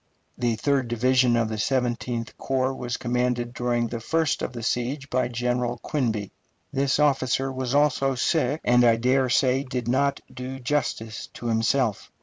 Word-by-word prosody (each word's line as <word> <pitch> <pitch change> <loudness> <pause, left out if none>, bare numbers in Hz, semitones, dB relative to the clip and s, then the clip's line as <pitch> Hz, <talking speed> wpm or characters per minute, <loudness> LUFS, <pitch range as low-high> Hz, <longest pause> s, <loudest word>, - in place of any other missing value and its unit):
The 120 -2 0
third 135 +1 +1
division 125 +1 +3
of 115 -1 +2
the 110 -1 -4
Seventeenth 120 -1 -1
Corps 130 0 0
was 120 -2 -4
commanded 125 0 -1
during 120 -1 0
the 115 0 -4
first 160 +6 0
of - - -2
the 120 -2 -7
siege 135 +5 -2
by 130 -1 +1
General 120 0 -1
Quinby. 115 -7 -2 0.4
This 135 -1 +1
officer 135 -2 +2
was 130 0 -2
also 135 -2 +2
sick, 145 +2 +1
and 125 0 +4
I 115 -1 +6
dare 130 +3 +2
say 130 +1 +3
did 125 -3 -4
not 140 +3 +1
do 130 +1 -6
justice 125 -4 -2
to - - -9
himself. 115 0 0
125 Hz, 160 wpm, -25 LUFS, 120-135 Hz, 0.4 s, I